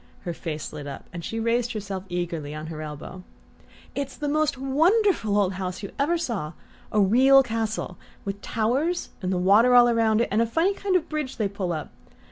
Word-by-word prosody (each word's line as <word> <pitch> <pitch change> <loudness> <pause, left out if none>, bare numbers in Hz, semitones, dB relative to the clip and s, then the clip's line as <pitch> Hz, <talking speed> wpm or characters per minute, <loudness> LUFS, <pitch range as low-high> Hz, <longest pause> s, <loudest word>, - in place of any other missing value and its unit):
Her 175 - -4
face 155 -3 -5
lit 145 -1 -7
up 140 - -8
and 170 -1 -6
she 225 +7 -4
raised 235 +1 0
herself 200 -3 -5
eagerly 165 -4 -3
on 155 0 -6
her 155 - -6
elbow. 155 +4 -7 0.7
"It's 275 -1 -4
the 295 - -3
most 305 -1 +1
wonderful 295 - +2
old 195 -2 +2
house 185 +1 -5
you 200 - -5
ever 320 +5 +2
saw: 210 - -3 0.4
a 215 - +2
real 260 +7 +6
castle, 225 -5 -3 0.3
with 200 0 -4
towers, 260 - 0
and 185 -1 -1
water 225 +6 +6
all 240 -1 +7
round 225 -1 +3
it, - - 0
and 215 +3 +3
a 230 - +2
funny 330 - +2
kind 390 -1 -1
of 360 - +2
bridge 305 -4 -4
they 215 - +1
pull 195 -3 -3
up. 155 -3 -4
220 Hz, 195 wpm, -25 LUFS, 185-270 Hz, 0.7 s, all